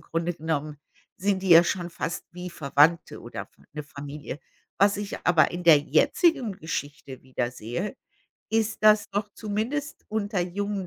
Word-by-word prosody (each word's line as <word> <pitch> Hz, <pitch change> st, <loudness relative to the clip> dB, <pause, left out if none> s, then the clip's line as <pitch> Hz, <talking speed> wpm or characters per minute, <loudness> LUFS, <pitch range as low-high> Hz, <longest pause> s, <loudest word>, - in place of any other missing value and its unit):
Grunde 165 Hz, +2 st, -2 dB
genommen 155 Hz, -2 st, -3 dB, 0.4 s
sind 195 Hz, 0 st, 0 dB
die 190 Hz, -, -2 dB
ja 170 Hz, 0 st, +9 dB
schon 175 Hz, -1 st, -2 dB
fast 165 Hz, -, -4 dB
wie 180 Hz, 0 st, -7 dB
Verwandte 150 Hz, +2 st, +2 dB
oder -, -, -7 dB
F -, -, -15 dB, 0.3 s
'ne 150 Hz, -, -4 dB
Familie. 145 Hz, 0 st, -8 dB, 0.4 s
Was 200 Hz, +1 st, +4 dB
ich 205 Hz, -1 st, -5 dB
aber 170 Hz, -3 st, +5 dB
in 175 Hz, 0 st, -5 dB
der 165 Hz, -4 st, +8 dB
jetzigen 270 Hz, -, +2 dB
Geschichte 145 Hz, -6 st, -6 dB
wiedersehe, 125 Hz, -, -4 dB, 0.5 s
ist, 220 Hz, -1 st, 0 dB
dass 215 Hz, -1 st, +5 dB
doch 205 Hz, +1 st, -2 dB
zumindest 230 Hz, +8 st, -3 dB
unter 205 Hz, -3 st, -1 dB
jungen 195 Hz, +2 st, -3 dB
175 Hz, 150 wpm, -26 LUFS, 150-205 Hz, 0.5 s, ja